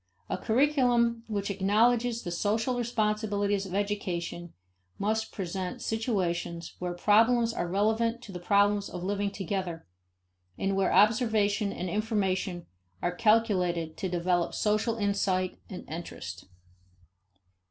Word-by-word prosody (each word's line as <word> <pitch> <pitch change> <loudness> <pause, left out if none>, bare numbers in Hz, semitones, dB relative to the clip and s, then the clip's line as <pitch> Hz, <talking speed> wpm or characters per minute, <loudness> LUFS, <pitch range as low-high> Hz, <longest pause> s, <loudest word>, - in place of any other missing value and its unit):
A - - 0
curriculum 240 -2 +2
which 200 -2 -2
acknowledges 230 +4 +2
the 175 - -4
social 220 +7 0
responsibilities 210 -4 0
of 185 - -5
education 180 -4 -2 0.5
must 220 +2 -1
present 185 -1 -4
situations 175 -7 -2
where 180 -1 -3
problems 225 +5 +4
are 175 - -2
relevant 220 +5 +1
to 210 - -9
the 180 - -6
problems 200 +2 +2
of 180 -1 -6
living 200 +1 -1
together, 190 -3 -4 0.7
and 195 0 0
where 195 0 +2
observation 210 0 +3
and 185 - -4
information 190 -3 -1 0.3
are 175 - -1
calculated 180 -7 +2
to 190 - -2
develop 175 0 0
social 215 +2 +1
insight 200 -3 0
and 185 - -8
interest. 165 +2 -7
205 Hz, 120 wpm, -29 LUFS, 180-220 Hz, 0.7 s, problems